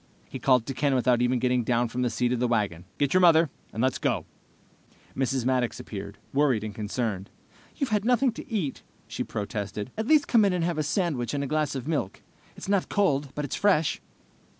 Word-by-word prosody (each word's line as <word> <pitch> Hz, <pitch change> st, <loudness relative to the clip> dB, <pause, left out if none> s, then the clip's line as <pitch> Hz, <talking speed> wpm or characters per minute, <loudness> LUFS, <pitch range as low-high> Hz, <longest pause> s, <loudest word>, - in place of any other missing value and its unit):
He -, -, -7 dB
called 125 Hz, -3 st, +3 dB
to 135 Hz, -, -4 dB
Ken 135 Hz, +1 st, +1 dB
without 125 Hz, -1 st, +3 dB
even 125 Hz, +1 st, +2 dB
getting 125 Hz, 0 st, +1 dB
down 120 Hz, +1 st, +1 dB
from 125 Hz, +2 st, -4 dB
the 125 Hz, -, +1 dB
seat 125 Hz, +1 st, 0 dB
of 125 Hz, -, -1 dB
the 125 Hz, -, +2 dB
wagon. 100 Hz, -7 st, -1 dB
"Get 140 Hz, -2 st, +1 dB
your 185 Hz, -, +5 dB
mother, 165 Hz, -4 st, +5 dB, 0.2 s
and 110 Hz, -, -2 dB
let's 130 Hz, -1 st, +1 dB
go!" -, -, 0 dB, 0.9 s
Mrs. 130 Hz, -1 st, 0 dB
Maddox 125 Hz, -2 st, 0 dB
appeared, 100 Hz, -1 st, -7 dB, 0.2 s
worried 135 Hz, -6 st, +2 dB
and 110 Hz, -1 st, -5 dB
concerned. 105 Hz, -2 st, -3 dB, 0.5 s
"You've 275 Hz, -6 st, -2 dB
had 210 Hz, -1 st, +2 dB
nothing 250 Hz, +2 st, +3 dB
to 230 Hz, -, -10 dB
eat," 180 Hz, -12 st, -2 dB, 0.3 s
she -, -, -3 dB
protested. 105 Hz, +1 st, -4 dB
"At 220 Hz, +1 st, -3 dB
least 305 Hz, -1 st, +4 dB
come 230 Hz, -3 st, +5 dB
in 200 Hz, -2 st, +3 dB
and 180 Hz, -2 st, 0 dB
have 170 Hz, -2 st, -1 dB
a -, -, +3 dB
sandwich 150 Hz, -, -1 dB
and 140 Hz, -, -1 dB
a -, -, -2 dB
glass 150 Hz, 0 st, -1 dB
of 130 Hz, 0 st, -5 dB
milk. 140 Hz, -, -2 dB, 0.3 s
It's -, -, -9 dB
not 200 Hz, -2 st, +1 dB
cold, 145 Hz, -9 st, +1 dB
but 150 Hz, -, -2 dB
it's 140 Hz, -, -4 dB
fresh." 185 Hz, -7 st, +2 dB
130 Hz, 215 wpm, -27 LUFS, 120-165 Hz, 0.9 s, your